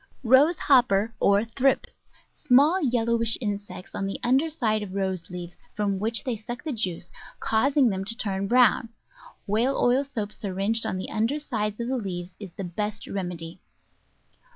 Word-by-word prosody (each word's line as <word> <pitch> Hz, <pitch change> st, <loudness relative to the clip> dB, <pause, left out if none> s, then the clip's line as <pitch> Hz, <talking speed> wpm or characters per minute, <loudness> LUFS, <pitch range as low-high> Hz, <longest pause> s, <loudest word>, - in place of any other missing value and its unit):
Rose 270 Hz, +8 st, +5 dB
Hopper, 230 Hz, -5 st, +3 dB
or 200 Hz, +2 st, +3 dB
Thrips 260 Hz, +4 st, 0 dB, 0.3 s
— -, -, -33 dB
small 295 Hz, +8 st, +5 dB
yellowish 235 Hz, -4 st, +1 dB
insects 200 Hz, -4 st, -5 dB
on 195 Hz, -, -2 dB
the 195 Hz, -, -4 dB
under 265 Hz, +6 st, +3 dB
side 220 Hz, -9 st, 0 dB
of 195 Hz, -2 st, -7 dB
Rose 190 Hz, -3 st, -2 dB
leaves, 175 Hz, -1 st, -8 dB, 0.2 s
from 200 Hz, -2 st, -1 dB
which 225 Hz, +3 st, 0 dB
they 250 Hz, -3 st, -1 dB
suck 240 Hz, +3 st, -7 dB
the 310 Hz, -, -3 dB
juice, 185 Hz, -6 st, -3 dB, 0.3 s
causing 265 Hz, +3 st, +3 dB
them 190 Hz, -2 st, -2 dB
to 230 Hz, +3 st, -2 dB
turn 195 Hz, -4 st, -2 dB
brown; 240 Hz, -1 st, +4 dB, 0.6 s
whale 230 Hz, +7 st, +1 dB
oil 250 Hz, +3 st, +3 dB
soap 225 Hz, -7 st, -5 dB
syringed 205 Hz, +2 st, -2 dB
on 185 Hz, -, -2 dB
die 185 Hz, -, -4 dB
under 225 Hz, +7 st, 0 dB
side 215 Hz, -8 st, -3 dB
of 235 Hz, -, -2 dB
the 260 Hz, +1 st, -1 dB
leaves 180 Hz, -5 st, -5 dB
is 200 Hz, -4 st, -8 dB
the 195 Hz, -, -6 dB
best 210 Hz, +4 st, -4 dB
remedy. 175 Hz, -3 st, -5 dB
220 Hz, 170 wpm, -26 LUFS, 195-250 Hz, 0.6 s, Rose